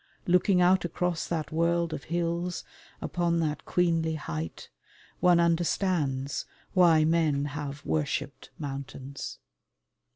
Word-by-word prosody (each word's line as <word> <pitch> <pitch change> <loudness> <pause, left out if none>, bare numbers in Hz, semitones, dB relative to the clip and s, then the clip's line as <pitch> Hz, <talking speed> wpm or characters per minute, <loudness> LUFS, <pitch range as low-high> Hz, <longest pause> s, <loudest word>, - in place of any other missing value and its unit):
Looking 180 +1 +4
out 180 +1 +5
across 175 0 -1
that 160 -3 -2
world 170 +1 +1
of - - -6
hills 170 +1 -1 0.4
upon 170 -1 0
that 155 -2 -2
queenly 165 -2 +1
height 80 - -5 0.5
one 175 -1 +5
understands 165 -5 +1 0.3
why 165 -4 +6
men 155 -3 +2
have 145 0 -5
worshipped 145 -1 -2
mountains. 135 -1 -6
165 Hz, 105 wpm, -28 LUFS, 145-175 Hz, 0.5 s, why